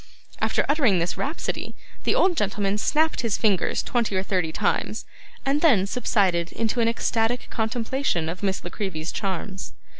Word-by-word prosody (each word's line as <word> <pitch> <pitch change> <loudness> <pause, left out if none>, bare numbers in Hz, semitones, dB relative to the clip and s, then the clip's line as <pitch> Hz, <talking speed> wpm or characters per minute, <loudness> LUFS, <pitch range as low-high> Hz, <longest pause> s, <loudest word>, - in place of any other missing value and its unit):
After - - +1
uttering 275 - +3
this 170 +1 0
rhapsody, 300 +5 -3 0.3
the - - +3
old 365 -1 +3
gentleman 205 -3 0
snapped 315 +7 +2
his 230 -4 0
fingers 205 -5 +1
twenty 235 -5 0
or 190 - +1
thirty 185 -5 0
times, - - -1 0.4
and 280 +2 +2
then 240 - +5
subsided 195 -6 +1
into 230 +2 -1
an 230 - +3
ecstatic 230 +1 0
contemplation 225 - -1
of 170 +3 -4
Miss 195 -1 -1
La 175 - -6
Creevy's 170 -6 -3
charms. 190 -1 -4
210 Hz, 155 wpm, -25 LUFS, 190-245 Hz, 0.4 s, then